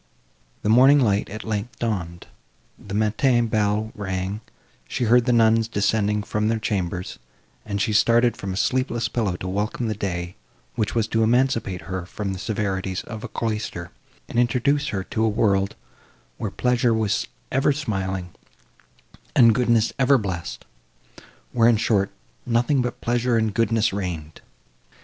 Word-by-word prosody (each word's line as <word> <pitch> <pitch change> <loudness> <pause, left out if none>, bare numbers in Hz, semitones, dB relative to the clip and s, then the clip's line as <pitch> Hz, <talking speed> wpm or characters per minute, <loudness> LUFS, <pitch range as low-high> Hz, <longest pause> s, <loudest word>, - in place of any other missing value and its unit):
The 105 - 0
morning 130 +6 +7
light, 105 -6 +1
at 110 +1 -7
length, 110 +1 -4
dawned; 90 -7 -3 0.5
the 100 0 -7
matin 120 +3 +2
bell 110 0 0
rang; 95 -1 -3 0.5
she - - -2
heard 120 +1 +4
the 125 - +2
nuns 115 -1 +4
descending 105 -1 +1
from 105 0 -1
their 115 0 +1
chambers, 90 -5 -3 0.5
and 100 -1 -2
she 105 +2 0
started 120 +3 +4
from 100 - -5
a 95 - -4
sleepless 120 -1 0
pillow 105 -5 -1
to 90 - -6
welcome 105 +5 -2
the 110 - 0
day, 90 -3 -4 0.4
which 110 - -2
was 115 -2 +1
to 115 - +1
emancipate 115 -5 +1
her 95 -2 -5
from 100 0 -4
the 95 - -6
severities 95 -3 -2
of 110 -2 -8
a - - -4
cloister, 105 -6 -4 0.4
and 120 - -1
introduce 135 +4 +2
her 100 -8 -2
to 110 +3 -2
a 110 - +3
world, 100 -3 +1 0.6
where 110 - -2
pleasure 125 +2 +1
was 110 -3 0 0.2
ever 135 +3 +3
smiling, 95 - -3 1.0
and 115 -2 +7
goodness 115 -1 +2
ever 135 +1 +5
blessed—where, 85 - -4
in 115 - +4
short, 100 -3 +1 0.3
nothing 125 +3 +2
but 125 0 -4
pleasure 120 0 +1
and 110 -2 0
goodness 115 -1 +1
reigned! 85 -6 -5
110 Hz, 150 wpm, -23 LUFS, 95-120 Hz, 1.0 s, morning